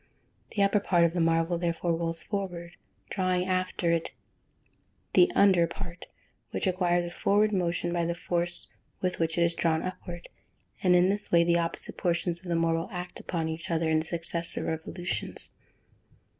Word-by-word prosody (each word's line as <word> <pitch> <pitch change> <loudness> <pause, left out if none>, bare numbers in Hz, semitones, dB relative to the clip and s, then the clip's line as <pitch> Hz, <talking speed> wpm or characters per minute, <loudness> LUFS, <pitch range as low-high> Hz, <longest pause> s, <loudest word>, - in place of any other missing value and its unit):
The 200 - +3
upper 200 +1 +3
part 175 -4 +3
of 165 -1 +3
the 180 - -1
marble, 165 +1 +2
therefore, 170 0 0
rolls 165 0 -2
forward, 180 -4 -4 0.4
drawing 185 -2 +1
after 185 -2 0
it 165 -1 0 1.0
the 360 0 +6
under 185 -4 +5
part, 170 +1 -8 0.4
which - - -2
acquires 175 -2 +2
a 175 - -6
forward 210 +2 +3
motion 175 -2 0
by 170 -1 +1
the 170 0 -1
force 175 0 -2 0.3
with 185 0 -2
which 165 0 0
it 170 - +4
is 170 0 +2
drawn 165 -1 +1
upward, 175 -1 -6 0.5
and 180 -1 +5
in 180 +1 +5
this 205 +1 -1
way 170 -1 +6
the 170 0 +3
opposite 165 0 -2
portions 175 0 0
of 185 - -13
the 170 - 0
marble 165 +1 +1
act 180 -1 -6
upon 165 -2 -2
each 160 +1 -5
other 165 -1 +1
in 155 - +4
the 160 - -3
successive 170 0 -1
revolutions. 160 +2 -3
175 Hz, 170 wpm, -28 LUFS, 165-185 Hz, 1.0 s, the